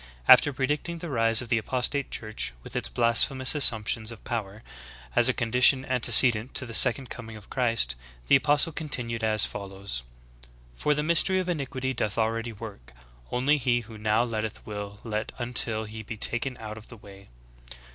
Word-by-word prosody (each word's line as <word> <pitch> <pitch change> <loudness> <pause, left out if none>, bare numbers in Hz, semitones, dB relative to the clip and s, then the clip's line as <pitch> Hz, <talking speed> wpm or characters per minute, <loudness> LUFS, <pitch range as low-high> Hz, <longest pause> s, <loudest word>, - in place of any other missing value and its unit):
After 145 - +6
predicting 145 +5 -3
the 165 -1 -8
rise 115 -2 +3
of 120 - -11
the 120 -2 +1
apostate 130 +5 -2
church, 110 - -4
with - - -12
its - - -3
blasphemous 120 - +3
assumptions 115 -5 +1
of 115 - -13
power, 110 -1 -6 0.5
as - - +5
a - - +4
condition 125 +3 +2
antecedent 120 -1 +5
to - - 0
the 115 - -10
second 125 +3 +4
coming 115 -2 -10
of 105 - -17
Christ, 115 - 0 0.3
the - - +5
apostle 145 +3 +2
continued 120 -7 -3
as 110 -1 +5
follows: 100 -8 -6 0.7
"For 150 - -1
the 150 - -2
mystery 170 +4 +3
of 185 - -4
iniquity 130 -5 -4
doth 110 -4 -3
already 115 +1 -2
work: 100 - -12 0.4
only 135 +5 +1
he 120 -3 -1
who 110 -1 -13
now 110 +2 0
letteth 110 -2 -6
will 105 -1 -8
let 110 -2 -5
until 120 -2 -2
he 110 +1 -9
be 110 +1 -9
taken 120 +4 -2
out 110 -1 -9
of 110 - -16
the 115 - -13
way. 100 -2 -16
115 Hz, 175 wpm, -25 LUFS, 110-130 Hz, 0.7 s, After